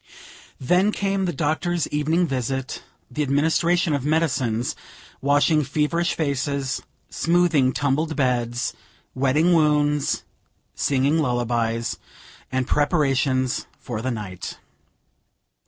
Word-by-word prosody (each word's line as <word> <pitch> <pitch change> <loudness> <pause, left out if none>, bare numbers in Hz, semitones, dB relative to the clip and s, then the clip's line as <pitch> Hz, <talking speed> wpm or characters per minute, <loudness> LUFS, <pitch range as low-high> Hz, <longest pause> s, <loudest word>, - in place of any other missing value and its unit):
Then 180 +10 +3
came 195 -2 -1
the 175 - 0
doctor's 170 +2 -1
evening 155 +4 +1
visit; 135 -2 -3 0.3
the 150 - -2
administration 160 +4 +2
of 140 -3 -1
medicines; 130 -7 0 0.5
washing 145 +2 +3
feverish 155 +5 0
faces; 140 -2 -1 0.3
smoothing 165 -6 +3
tumbled 145 +4 0
beds; 120 -3 0 0.4
wetting 145 +7 +2
wounds; 150 -2 +2 0.5
singing 140 +3 +1
lullabies; 120 -3 -1 0.5
and 130 0 0
preparations 135 -3 +1
for 115 -3 -5
the 130 - -2
night. 105 -6 -5
145 Hz, 95 wpm, -23 LUFS, 130-160 Hz, 0.5 s, Then